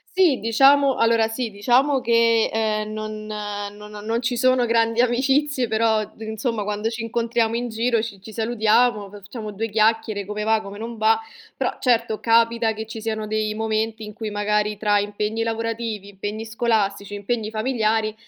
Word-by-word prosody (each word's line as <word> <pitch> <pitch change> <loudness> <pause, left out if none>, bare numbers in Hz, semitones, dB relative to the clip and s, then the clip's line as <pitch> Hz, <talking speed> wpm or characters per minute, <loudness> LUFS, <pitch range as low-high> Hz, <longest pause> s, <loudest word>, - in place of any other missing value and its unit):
Sì, 340 - +4
diciamo 270 +5 +4
allora, 230 -1 +3
sì, 230 +1 -3
diciamo 255 +7 +2
che, 230 -1 +3
ehm, 215 -1 -1
non 215 0 -5
non 205 0 -6
non 230 +2 0
ci 250 0 -1
sono 255 0 +3
grandi 230 0 +2
amicizie 260 +1 +2
però, 220 0 +2
uhm, 210 - -9 0.2
insomma, 220 -1 -2
quando 210 +2 -2
ci 225 0 -5
incontriamo 230 0 0
in 240 0 -3
giro 230 0 +1
ci 205 -4 -7
ci 220 - -11
salutiamo, 220 -1 +2
facciamo 205 +2 -8
2 220 +2 -3
chiacchiere, 215 -2 +1
come 210 0 -4
va, 220 0 +3
come 200 0 -9
non 230 +1 -7
va. 220 0 +4 0.4
Però, - - -2
certo, 230 -3 +1
capita 230 -1 +3
che 220 +1 -5
ci 225 0 -8
siano 220 -1 -3
dei 215 0 -1
momenti 220 0 -2
in 210 - -8
cui, 220 0 -5
magari, 210 0 0
tra 205 0 +2
impegni 210 +2 -2
lavorativi, 225 -2 -3
impegni 205 +3 -5
scolastici, 215 -3 -1
impegni 215 +2 -2
familiari 220 -1 0
220 Hz, 165 wpm, -22 LUFS, 210-230 Hz, 0.4 s, Sì